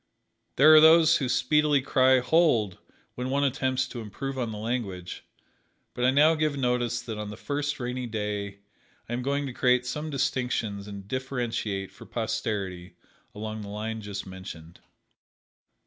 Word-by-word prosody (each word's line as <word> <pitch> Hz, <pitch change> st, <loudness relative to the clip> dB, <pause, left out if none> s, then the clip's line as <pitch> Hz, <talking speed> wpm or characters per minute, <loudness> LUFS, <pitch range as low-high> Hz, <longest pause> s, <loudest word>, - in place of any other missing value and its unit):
There 155 Hz, +4 st, +7 dB
are 155 Hz, -, +9 dB
those 160 Hz, +1 st, +7 dB
who 130 Hz, -4 st, -2 dB
speedily 150 Hz, +1 st, +3 dB
cry, 130 Hz, -1 st, +4 dB
"Hold!" 125 Hz, -, +2 dB, 0.3 s
when 125 Hz, +1 st, -4 dB
one 140 Hz, +2 st, +1 dB
attempts 130 Hz, -1 st, 0 dB
to 120 Hz, -, -6 dB
improve 135 Hz, +6 st, -5 dB
on 120 Hz, -4 st, -2 dB
the 105 Hz, -, -6 dB
language, 105 Hz, -6 st, -4 dB, 0.7 s
but 125 Hz, -, -3 dB
I 125 Hz, -, +5 dB
now 150 Hz, +4 st, +5 dB
give 155 Hz, -2 st, 0 dB
notice 125 Hz, -2 st, 0 dB
that 110 Hz, -3 st, -6 dB
on 105 Hz, -1 st, -5 dB
the 105 Hz, -, -8 dB
first 145 Hz, +2 st, -3 dB
rainy 125 Hz, 0 st, -3 dB
day 105 Hz, -2 st, -4 dB, 0.5 s
I 120 Hz, -, -5 dB
am 120 Hz, -, -2 dB
going 140 Hz, +2 st, -1 dB
to 130 Hz, -, -5 dB
create 125 Hz, 0 st, +2 dB
some 150 Hz, +5 st, -4 dB
distinctions 125 Hz, -7 st, -2 dB
and 100 Hz, -1 st, -9 dB
differentiate 120 Hz, -6 st, -3 dB
for -, -, -14 dB
posterity 100 Hz, -6 st, -3 dB, 0.4 s
along 110 Hz, +1 st, -5 dB
the 100 Hz, -, -8 dB
line 110 Hz, +2 st, -4 dB
just 100 Hz, -1 st, -6 dB
mentioned. 95 Hz, -3 st, -10 dB
125 Hz, 160 wpm, -27 LUFS, 105-135 Hz, 0.7 s, are